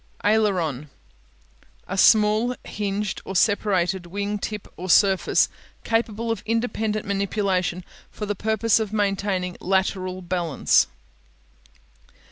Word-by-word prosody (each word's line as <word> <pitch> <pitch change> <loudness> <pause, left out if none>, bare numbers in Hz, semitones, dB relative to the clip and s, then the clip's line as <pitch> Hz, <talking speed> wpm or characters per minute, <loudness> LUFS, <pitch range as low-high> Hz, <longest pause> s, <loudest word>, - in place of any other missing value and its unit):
Aileron 215 +1 +4
(a'ler 185 - -1
on) 150 -2 -4 1.0
A 190 - -4
small 215 +4 +4
hinged 205 -1 -3
or 195 - -7
separated 190 -2 +1
wing 205 +3 -3
tip 210 0 -5
or 185 +2 -7
surface 195 +1 +4 0.4
capable 230 0 -1
of 225 - -3
independent 220 -2 -1
manipulation 195 -3 -1 0.3
for 210 - -6
the 205 - -1
purpose 220 +2 +1
of 215 -2 -3
maintaining 195 -3 -1
lateral 185 -1 -1
balance. 175 -5 +2
200 Hz, 110 wpm, -23 LUFS, 185-215 Hz, 1.0 s, Aileron